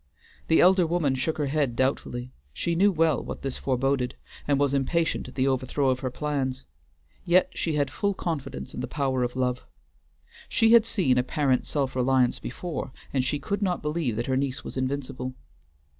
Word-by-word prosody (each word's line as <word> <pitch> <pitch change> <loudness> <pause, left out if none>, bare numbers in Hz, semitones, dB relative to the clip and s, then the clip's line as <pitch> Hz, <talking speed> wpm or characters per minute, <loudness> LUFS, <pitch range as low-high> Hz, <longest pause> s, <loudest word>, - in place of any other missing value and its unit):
The 160 - +5
elder 180 -1 +5
woman 160 -5 +1
shook 135 +5 -1
her 150 - 0
head 140 -3 0
doubtfully; 125 -1 -1 0.2
she 170 - -1
knew 195 +5 +4
well 160 -6 +2
what - - -7
this 135 -2 -3
foreboded, 130 -1 0 0.3
and 145 -1 +3
was 140 -1 +2
impatient 160 +5 0
at - - -11
the 130 0 +2
overthrow 130 +1 +1
of 130 - -1
her 130 - -2
plans; 135 -1 -2 0.6
yet 180 +2 +3
she 160 -3 -1
had 145 -1 0
full 200 -1 -1
confidence 140 - -4
in - - -6
the - - -3
power 135 -3 -1
of 125 0 -1
Love. 125 -1 -1 0.9
She 225 -1 +4
had 230 -1 +7
seen 150 - +2
apparent 130 +1 +1
self 135 -3 -1
reliance 130 -1 +2
before, 160 +2 -5 0.2
and 130 -2 +2
she 135 +3 0
could 200 +7 -3
not 180 -5 0
believe 150 -6 -1
that 120 +2 -2
her 130 - 0
niece 130 -1 -1
was - - -7
invincible. 130 -1 -3
135 Hz, 185 wpm, -26 LUFS, 130-160 Hz, 0.9 s, had